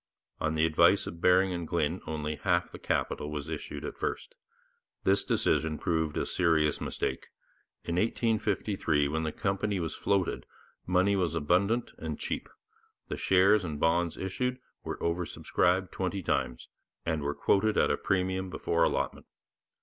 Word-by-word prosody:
On 80 0 0
the 80 +1 +3
advice 80 -1 +4
of 85 0 -8
Baring 90 +1 +4
and 85 -2 -4
Glyn - - 0
only 75 -1 -3
half 90 -3 +1
the - - -9
capital 75 - -1
was 75 0 -4
issued 80 -2 -5
at - - -7
first. - - -3 0.7
This 95 +1 +3
decision 80 -1 +1
proved 80 -2 -1
a - - 0
serious 80 -4 +2
mistake. - - -3 0.6
In 85 0 -2
1853, 105 -8 +1
when 80 +2 -1
the 80 -1 -2
company 95 +2 -1
was 80 -3 -2
floated, 100 -3 0 0.4
money 95 +2 +3
was 90 -3 0
abundant 95 +10 +1
and 80 -2 -4
cheap; - - -4 0.6
the - - -2
shares 95 +2 +4
and 75 -4 -4
bonds 85 +1 +1
issued 125 +7 -2 0.3
were - - -4
over 85 +1 0
subscribed 90 +2 0
twenty 95 0 -2
times, 60 -5 -1 0.4
and 80 -2 0
were 70 +1 -2
quoted 105 +2 +2
at - - +4
a - - +3
premium 95 0 -1
before 85 -2 0
allotment. - - -1
90 Hz, 155 wpm, -29 LUFS, 80-95 Hz, 0.7 s, advice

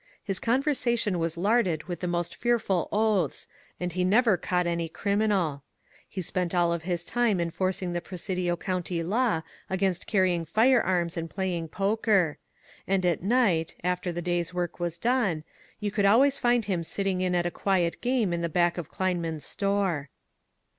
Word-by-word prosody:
His 195 -2 -2
conversation 240 - +1
was 165 0 -1
larded 190 -5 +2
with 175 -1 -5
the 180 - -3
most 175 -1 -2
fear* 240 0 +2
ful 195 -6 -1
oaths, 210 -7 +1 0.3
and 180 -1 -3
he 180 +1 0
never 215 +3 +4
caught 180 +1 0
any 170 -1 -1
criminal. 200 -6 0 0.5
He 185 - -4
spent 180 +1 -2
all 170 -1 +3
of 170 - -3
his 175 0 -2
time 235 -4 +1
enforcing 180 +1 -1
the 175 - -2
Presidio 180 -1 -2
County 180 -1 -2
law 210 -2 +1 0.3
against 190 -1 0
carrying 185 -4 +2
firearms 185 - +2
and 165 0 -3
playing 180 -3 -2
poker; 195 -3 +1 0.5
and 190 -1 +1
at 175 -2 +1
night, 195 -6 +2
after 180 0 -1
the 175 0 -4
day's 175 0 -1
work 175 -1 -2
was 170 -1 -2
done, 210 -8 +1 0.4
you 210 -1 -2
could 205 -1 +1
always 265 +7 +5
find 240 -3 +2
him 185 -4 -1
sitting 190 +2 -1
in 180 -1 +1
at 175 0 +1
a 175 - 0
quiet 180 -3 0
game 240 -7 +1
in 170 - -1
the 170 - -1
back 175 +1 +2
of 165 - -6
Kleinmann's 170 -5 -2
store. 195 -8 0
180 Hz, 170 wpm, -27 LUFS, 170-205 Hz, 0.5 s, always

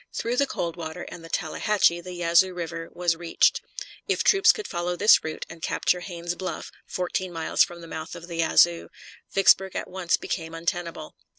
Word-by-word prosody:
Through 235 +2 -2
the 280 - +3
Coldwater 170 -3 -4
and 165 - -10
the 165 - -11
Tallahatchie 195 -2 +1
the 180 +1 -8
Yazoo 175 +2 +3
River 165 -1 -5
was 175 -2 0
reached. 165 0 +2 0.5
If - - +1
troops 390 0 +6
could 430 - -6
follow 175 0 -2
this 210 +4 +6
route 155 0 -5
and 165 0 -12
capture 180 - 0
Haynes's 175 -1 -5
Bluff, 185 +1 -6 0.2
fourteen 185 0 -3
miles 165 -1 +2
from 175 0 -7
the 165 - -10
mouth 160 -1 -6
of 170 - -10
the 170 -2 -6
Yazoo, 170 +1 +3 0.4
Vicksburg 195 -1 +4
at - - -3
once 180 -2 0
became 165 -2 -5
untenable. 170 -1 -4
175 Hz, 180 wpm, -25 LUFS, 165-185 Hz, 0.5 s, troops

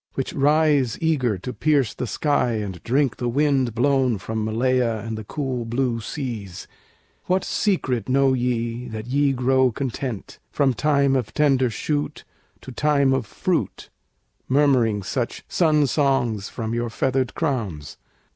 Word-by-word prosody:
which 135 - -3
rise 145 -3 +2
Eager 135 - +1
to 125 +8 -6
pierce 145 -7 +1
the 125 - -4
sky 145 -2 +1
and 100 -5 -4
drink 135 +1 +1
the 120 - -2
wind 135 -3 +1
Blown 130 -2 +2
from 110 +3 -4
Malaya 120 +1 +1
and 115 -1 -4
the 110 - -6
cool 130 0 -3
blue 120 0 -1
seas; 110 - -6 0.6
What 185 +1 +1
secret 130 - -1
know 135 0 +3
ye 120 -1 -2
that 110 -2 -6
ye 140 +3 +2
grow 130 0 +2
content, 125 -2 -5
From 135 -3 +1
time 140 0 +2
of 125 -4 -2
tender 135 -4 +3
shoot 145 +7 -3 0.4
to 130 - -9
time 140 0 +2
of 130 -5 -1
fruit, - - -2 0.6
Murmuring 130 -7 +3
such 120 +4 -3
sun 155 -4 +3
songs 130 -7 0
from 115 -1 -4
your 120 0 -1
feathered 130 +2 -1
crowns? 110 - -3
130 Hz, 145 wpm, -23 LUFS, 115-140 Hz, 0.6 s, know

